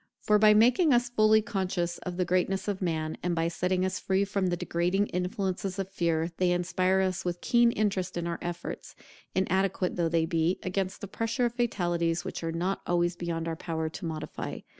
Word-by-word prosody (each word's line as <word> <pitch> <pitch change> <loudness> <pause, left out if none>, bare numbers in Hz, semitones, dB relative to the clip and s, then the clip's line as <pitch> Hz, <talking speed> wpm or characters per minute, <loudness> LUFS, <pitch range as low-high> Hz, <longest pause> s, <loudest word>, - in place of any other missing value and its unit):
For 210 0 +3
by 210 0 +7
making 250 - +5
us 245 0 +1
fully 220 -2 +4
conscious 185 -5 -2
of 180 -1 -6
the 180 - +1
greatness 185 +2 0
of 200 -2 -2
man, 160 -3 -2
and 175 -1 -1
by 165 0 +1
setting 180 +2 0
us 185 0 -2
free 195 +1 +1
from 200 -1 -1
the 175 -1 0
degrading 175 +4 0
influences 185 +1 -2
of 195 -1 -4
fear, 165 -2 0
they 180 -1 +2
inspire 185 +2 +1
us 185 -1 -1
with 175 -1 -2
keen 240 +2 +4
interest 195 -5 -1
in 170 - -2
our 170 -1 -3
efforts, 175 0 -6 0.4
inadequate 190 -1 0
though 170 -2 +1
they 165 -1 +2
be, 165 +2 +1
against 190 +1 -2
the 200 - -5
pressure 230 +5 -1
of 235 - -1
fatalities 175 -8 0
which - - -5
are 165 - -1
not 180 +4 -2
always 175 0 +1
beyond 170 -1 -3
our 165 - -2
power 160 -1 -3
to 170 - -9
modify. 160 -2 -5
185 Hz, 200 wpm, -28 LUFS, 170-200 Hz, 0.4 s, by